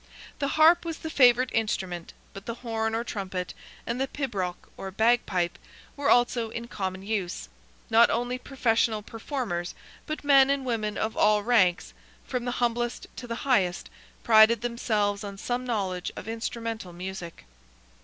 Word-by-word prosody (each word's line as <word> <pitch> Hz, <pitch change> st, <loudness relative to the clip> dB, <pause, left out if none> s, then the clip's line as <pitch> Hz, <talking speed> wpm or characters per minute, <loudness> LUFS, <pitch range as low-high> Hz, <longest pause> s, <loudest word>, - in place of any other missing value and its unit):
The 280 Hz, -, 0 dB
harp 330 Hz, +3 st, +6 dB
was 330 Hz, -2 st, -4 dB
the 320 Hz, -, -6 dB
favourite 250 Hz, -2 st, +5 dB
instrument, 190 Hz, -6 st, -2 dB, 0.2 s
but 195 Hz, +1 st, -10 dB
the 230 Hz, -, -3 dB
horn 225 Hz, -1 st, -1 dB
or 230 Hz, -, -1 dB
trumpet, 190 Hz, -5 st, -4 dB, 0.3 s
and 235 Hz, +2 st, -2 dB
the 270 Hz, -, +1 dB
pibroch 205 Hz, -12 st, -3 dB, 0.2 s
or 195 Hz, -, -6 dB
bagpipe, 195 Hz, -5 st, +1 dB, 0.4 s
were 285 Hz, 0 st, 0 dB
also 240 Hz, -1 st, +3 dB
in 235 Hz, +1 st, -6 dB
common 190 Hz, -2 st, -4 dB
use. 195 Hz, -, -3 dB, 0.4 s
Not 230 Hz, +1 st, +6 dB
only 245 Hz, +2 st, -1 dB
professional 230 Hz, -5 st, 0 dB
performers, 225 Hz, -, -4 dB, 0.3 s
but 310 Hz, -1 st, -4 dB
men 275 Hz, -2 st, +6 dB
and 280 Hz, -1 st, 0 dB
women 215 Hz, -4 st, -2 dB
of 220 Hz, 0 st, -2 dB
all 210 Hz, -1 st, +3 dB
ranks, 200 Hz, -7 st, +2 dB, 0.3 s
from 250 Hz, -2 st, -3 dB
the 245 Hz, -, -1 dB
humblest 240 Hz, 0 st, -1 dB
to 245 Hz, -, -7 dB
the 230 Hz, -, -3 dB
highest, 190 Hz, -10 st, +1 dB, 0.3 s
prided 220 Hz, 0 st, +6 dB
themselves 215 Hz, -4 st, 0 dB
on 200 Hz, -1 st, -7 dB
some 245 Hz, +4 st, -3 dB
knowledge 190 Hz, -6 st, -2 dB
of -, -, -8 dB
instrumental 225 Hz, -3 st, -4 dB
music. 180 Hz, -, -7 dB
225 Hz, 155 wpm, -27 LUFS, 195-245 Hz, 0.4 s, harp